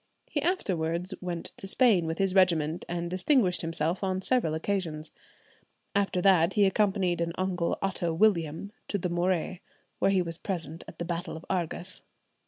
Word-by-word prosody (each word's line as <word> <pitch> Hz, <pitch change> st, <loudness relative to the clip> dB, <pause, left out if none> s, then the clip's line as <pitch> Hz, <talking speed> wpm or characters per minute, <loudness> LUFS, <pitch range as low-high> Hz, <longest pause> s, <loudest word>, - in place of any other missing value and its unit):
He 290 Hz, -, 0 dB
afterwards 180 Hz, -, -1 dB
went 175 Hz, -2 st, -4 dB
to 195 Hz, -, -6 dB
Spain 195 Hz, -6 st, +4 dB
with 160 Hz, +1 st, -2 dB
his 195 Hz, -2 st, +1 dB
regiment, 170 Hz, -4 st, +2 dB
and 175 Hz, 0 st, -2 dB
distinguished 185 Hz, -, +2 dB
himself 165 Hz, +2 st, -1 dB
on 185 Hz, -1 st, 0 dB
several 190 Hz, -6 st, +1 dB
occasions; 160 Hz, -3 st, -3 dB, 0.8 s
after 195 Hz, -3 st, +1 dB
that 185 Hz, -2 st, +5 dB
he 205 Hz, -2 st, +4 dB
accompanied 190 Hz, -3 st, +1 dB
an 170 Hz, 0 st, -1 dB
uncle 180 Hz, -2 st, -1 dB
Otto 185 Hz, -3 st, -1 dB
William 170 Hz, -1 st, +1 dB, 0.2 s
to 205 Hz, -, -1 dB
the 180 Hz, -1 st, -2 dB
Morea, 175 Hz, 0 st, 0 dB, 0.4 s
where -, -, +3 dB
he 190 Hz, -2 st, +3 dB
was 165 Hz, -1 st, +4 dB
present 165 Hz, -4 st, -4 dB
at -, -, -11 dB
the 170 Hz, -, -4 dB
battle 170 Hz, -1 st, -4 dB
of 160 Hz, -, -12 dB
Argas. 180 Hz, 0 st, -3 dB
180 Hz, 165 wpm, -28 LUFS, 165-195 Hz, 0.8 s, that